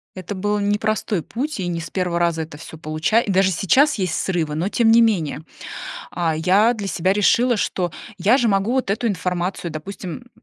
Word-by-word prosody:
Это 185 +2 -6
был 205 +2 -1
непростой 205 -2 0
путь, 280 +2 -4
и 185 - -2
не 170 -1 -2
с 165 - -7
1 180 -2 -1
раза 170 -2 +1
это 155 -2 -11
всё 160 - -10
получа 155 +8 +1
и 205 - -2
даже 190 0 +3
сейчас 260 - +3
есть 185 -5 -1
срывы, 165 -5 -1
но 165 +6 -1
тем 225 +1 +3
не 230 +1 +7
менее. 170 -9 +1 0.7
А 165 -2 -1
я 190 +8 +3
для 210 -4 -5
себя 185 -1 +1
решила, 230 +4 +3
что 180 -4 -1 0.2
я 205 +8 +3
же 240 - +2
могу 195 +3 +1
вот 260 -4 0
эту 215 +4 -1
информацию, 180 -2 -2
допустим, 185 +8 -7
190 Hz, 195 wpm, -21 LUFS, 170-215 Hz, 0.7 s, не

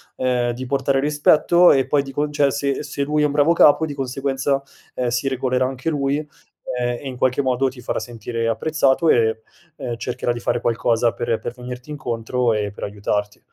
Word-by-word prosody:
ehm, 125 -1 0
di 130 +2 -6
portare 135 +1 +1
rispetto 150 +4 +4
e 135 -2 +3
poi 140 +1 +2
di 135 -1 -8
con 145 +2 -1
cioè 145 -1 +2
se 140 0 -1
se 145 -1 -3
lui 150 +1 0
è - - +4
un - - -3
bravo 150 +3 +4
capo 160 0 +5
di 145 - -5
conseguenza, 135 +1 -1 0.4
ehm, 125 -1 -1
si 125 +3 -1
regolerà 130 -1 0
anche 130 +4 -3
lui 140 -1 0
e 150 0 -6 0.5
e 120 +1 -2
in 130 -2 -5
qualche 130 +2 +1
modo 130 0 +1
ti 125 -1 -7
farà - - -2
sentire 115 0 -4
apprezzato, 140 +6 +2
e 110 -1 +3 0.3
ehm, 120 -2 -5
cercherà 120 0 -2
di 120 - -3
fare 120 - -1
qualcosa 115 0 +1
per 115 -2 -1
per 120 - -5
venirti 125 +3 -8
incontro 120 -3 -1
e 105 -2 -2
per - - -10
aiutarti. 105 0 -3
130 Hz, 200 wpm, -21 LUFS, 120-140 Hz, 0.5 s, capo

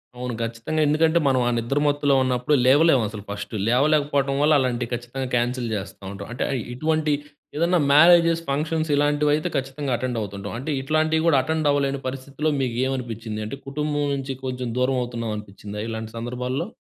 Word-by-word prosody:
అవును, 125 0 -4
ఖచ్చితంగా. 115 +7 -2
ఎందుకంటే, 160 +2 +3
మనం 130 -2 +3
ఆ - - +3
నిద్ర 120 +5 0
మత్తులో 145 -1 +2
ఉన్నప్పుడు, 125 +2 0
లేవలేమసలు 130 -7 +3
ఫస్ట్. 100 +2 -6 0.2
లేవలేకపోవటం 140 +1 +2
వల్ల, 150 +1 +4
అలాంటివి 125 -2 -1
ఖచ్చితంగా 120 +2 -4
క్యాన్సిల్ 120 0 0
చేస్తా 100 0 -7
ఉంటాం. 100 0 -8
అంటే, 125 - -2
అ - - 0 0.2
ఇటువంటి 155 +2 0 0.4
ఏదన్నా 170 +2 +2
మ్యారేజెస్, 165 +1 +6
ఫంక్షన్స్ 155 +3 -1
ఇలాంటివైతే, 145 +1 +2
ఖచ్చితంగా 135 +1 -3
అటెండ్ 125 -1 -2
అవుతుంటాం. 100 0 -6
అంటే, 140 +5 -4
ఇట్లాంటివి 155 +3 +1
కూడా, 145 -5 +5
అటెండ్ 160 -2 0
అవ్వలేని 140 -1 0
పరిస్థితిలో 135 +4 -3
మీకేమనిపిచ్చింది? 120 -3 -2
అంటే, 140 - -6
కుటుంబం 150 +1 -1
నుంచి 135 -1 -4
కొంచెం 125 -1 -3
దూరమవుతున్నామనిపిచ్చిందా 115 -5 -3
ఇలాంటి 110 0 -5
సందర్భాల్లో? 125 - -3
135 Hz, 145 wpm, -23 LUFS, 120-150 Hz, 0.4 s, మ్యారేజెస్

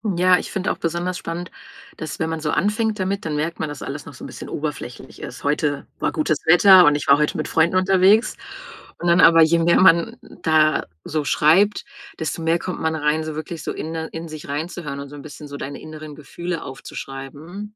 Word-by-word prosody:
Ja, 180 +1 +5
ich - - -5
finde 190 -2 -1
auch - - -4
besonders 175 +2 -2
spannend, 170 +1 -6 0.5
dass, 155 - -6
wenn 160 -1 -1
man 160 -1 -3
so 155 - -2
anfängt 210 +1 0
damit, 195 +1 -2
dann 155 -2 -2
merkt 160 +3 -2
man, 155 - -2
dass 145 -2 -8
alles 145 +2 -6
noch 145 - -10
so - - -12
'n - - -6
bisschen - - -9
oberflächlich 150 -5 -6
ist: 125 - -8
„Heute 145 -1 -1
war - - -1
gutes 155 -1 0
Wetter 180 +2 +8
und 150 0 +5
ich 145 - -3
war 140 - +7
heute 150 0 0
mit 155 - -3
Freunden 165 +3 +2
unterwegs” 190 +4 +4 0.6
und 175 - -1
dann 170 - +4
aber, 165 0 +7
je 165 +1 +4
mehr 170 +2 +4
man 170 -2 +4
da 155 -1 +1 0.2
so 155 -1 -3
schreibt, 185 +9 +3 0.3
desto 160 +1 -3
mehr 165 +1 +1
kommt 185 - -5
man 160 0 -1
rein, 155 +1 0
so 155 -1 -5
wirklich 155 +1 -6
so - - -4
inne 160 0 -5
in 165 0 -6
sich 155 -1 -9
reinzuhören 150 -1 -5
und 140 - -9
so 145 - -10
'n - - -9
bisschen 150 0 -10
so 140 - -7
deine 140 - -7
inneren 155 -1 -9
Gefühle 170 +3 -6
aufzuschreiben. 145 +9 -8
160 Hz, 215 wpm, -21 LUFS, 150-175 Hz, 0.6 s, Wetter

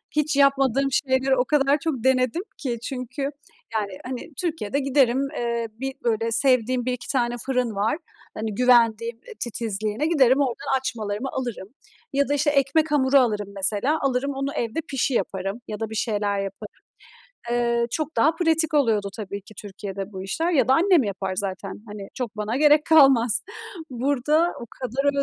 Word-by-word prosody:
Hiç 300 0 +1
yapmadığım 275 -1 +3
şeyleri 265 0 +2
o 250 0 +1
kadar 280 0 +3
çok 290 -8 -2
denedim 260 +5 +2
ki 245 -4 -3
çünkü, 255 +1 -5 0.5
yani, 210 -2 -1
hani, 255 +5 -6
Türkiye'de 310 - -2
giderim, 270 -1 +2
eee, 235 -1 -1
1 265 +5 -5
böyle, 230 -1 0
sevdiğim 250 0 +2
1-2 250 -1 -3
tane 240 -3 0
fırın 250 -4 0
var, 215 +8 0 0.4
hani, 215 -1 -4
güvendiğim, 235 -1 +3
ııı, 355 - -13
titizliğine, 220 +1 -2
giderim 270 -5 +4
oradan 265 0 0
açmalarımı 220 -2 -3
alırım 240 -7 -4 0.5
ya 280 0 +2
da, - - +2
işte, 290 +1 +2
ekmek 290 +3 +2
hamuru 275 -2 +4
alırım 210 -5 0
mesela, 210 +10 +2
alırım 275 0 0
onu 275 +1 -3
evde 235 +7 -2
pişi 270 0 0
yaparım 195 0 -2
ya 210 - -5
da 225 -1 -3
bir 220 - -7
şeyler 205 -2 0
yaparım. 195 +2 -6 0.8
Eee, 235 0 +1
çok 310 +3 -3
daha 315 +2 +4
pratik 325 -2 +1
oluyordu 225 -8 +2
tabii 200 -2 -6
ki 215 +2 -16
Türkiye'de 200 0 -7
bu 190 - -6
işler 320 - -1
ya 275 -6 +3
da 265 - +6
annem 350 -1 +4
yapar 195 -2 -3
zaten, 195 +1 -4
hani, 205 -2 -8
çok 235 -4 -5
bana 210 +3 -2
gerek 300 +1 +5
kalmaz. 265 -6 +5 0.5
Burada 285 +6 +1
o 235 - -7
kadar 275 +3 -1
250 Hz, 165 wpm, -24 LUFS, 220-275 Hz, 0.8 s, da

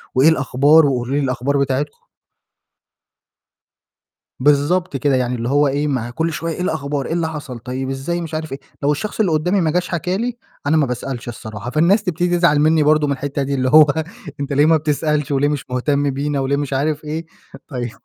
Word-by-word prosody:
وإيه 135 +5 +6
الأخبار 145 +1 +4
وقولوا 130 -1 -1
لي - - +2
الأخبار 135 +2 0
بتاعتكم. 140 +2 -2 2.3
بالضبط 145 +4 +2
كده، 140 0 +1
يعني 125 -1 0
اللي 120 +1 -3
هو 145 +1 +3
إيه، 145 +2 0
ما 130 -5 -1
هي - - -8
كُلّ 160 +6 -2
شوية 165 +1 -3
إيه - - -6
الأخبار؟ 140 -5 -2
إيه - - -3
اللي 170 -1 0
حصل؟ 145 -6 -7
طيب 130 +2 -4
إزاي 135 +6 -3
مش 165 -1 -7
عارف 155 -1 -4
إيه، 135 - -5 0.2
لو 145 - +3
الشخص 205 +10 -4
اللي 195 -6 +2
قدّامي 180 +6 +1
ما 160 -2 +1
جاش 180 +2 -1
حكى 180 +2 -1
لي، 240 +1 -3 0.3
أنا 160 - +3
ما 150 - +3
باسألش 125 0 -5
الصراحة، 110 -1 -7
فالناس 170 - +3
تبتدي 175 -1 0
تزعل 170 -4 +3
مني 155 +1 +4
برضه 150 0 +3
من 140 - +1
الحتّة 140 +1 -3
دي 140 +1 -2
اللي 130 -1 0
هو 155 +2 +8 0.5
أنت 140 0 -3
ليه 145 +2 +4
ما 160 0 +5
بتسألش 150 -1 -1
وليه 140 +1 +2
مش 145 -2 -3
مهتم 140 +3 0
بينا 140 +1 -2
وليه 135 +1 0
مش 145 -1 -3
عارف 150 +3 -1
إيه، 155 +2 -4 0.4
طيب 125 -5 -4
145 Hz, 205 wpm, -19 LUFS, 135-160 Hz, 2.3 s, هو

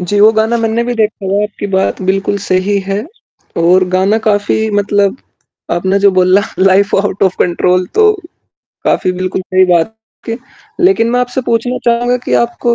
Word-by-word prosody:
जी, 190 +3 -1
वो 215 +1 +7
गाना 220 +2 +1
मैंने 225 +1 0
भी 245 0 -2
देखा 215 -2 -1
है, 205 - +1
आपकी 205 -1 -4
बात 190 +1 0
बिल्कुल 195 +2 0
सही 190 +2 0
है 200 +3 -2 0.6
और 185 +2 +4
गाना 190 +4 +1
काफ़ी 215 +1 +1
मतलब 205 +2 +1 0.6
आपने 190 +3 0
जो 200 0 +4
बोला 185 +2 +3 0.2
लाइफ़ 195 +2 +3
आउट 200 -1 -1
ऑफ 190 -1 +1
कंट्रोल 180 +1 +1
तो, 430 0 +4 0.7
काफ़ी 185 - +1
बिल्कुल 185 +1 -3
सही 185 0 +2
बात 175 +5 +1 0.3
की। 230 0 -3 0.4
लेकिन 350 -11 +3
मैं 250 0 +1
आपसे 250 +1 -2
पूछना 240 +2 -1
चाहूँगा 240 +1 +1
कि - - -1
आपको 235 0 0
205 Hz, 170 wpm, -13 LUFS, 185-230 Hz, 0.7 s, वो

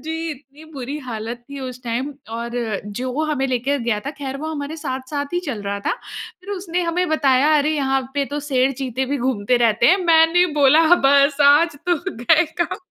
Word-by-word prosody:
जी। 325 0 -3
इतनी 290 +1 -12
बुरी 270 +1 -5
हालत 235 +1 -6
थी 280 -1 -7
उस 255 -1 -7
टाइम 245 +5 -2 0.2
और 235 +1 -5
अ, 220 -4 -2
जो 255 +8 -3
हमें 270 -3 0
लेके 260 +3 0
गया 235 -4 -1
था - - -1
खैर 270 -1 -4
वो 310 - -5
हमारे 290 +1 -5
साथ-साथ 285 +1 -4
ही 350 - +1
चल 225 -6 -4
रहा 200 0 -3
था। - - +1 0.5
फिर 375 +2 -10
उसने 360 -3 -2
हमें 350 +1 0
बताया 290 -1 +3
अरे 295 +1 +1
यहाँ 270 -1 +1
पे 285 -1 +1
तो 295 - -2
शेर 260 0 +2
चीते 260 0 -2
भी 285 - 0
घूमते 245 -2 0
रहते 225 +2 +2
हैं। 365 - +6
मैंने 330 +1 +5
बोला 285 +4 +6 0.3
बस 280 +1 +4
आज 300 +2 +3
तो 350 - +4 0.3
गए 310 +6 +5 0.2
काम 345 - 0
275 Hz, 200 wpm, -20 LUFS, 250-310 Hz, 0.5 s, हैं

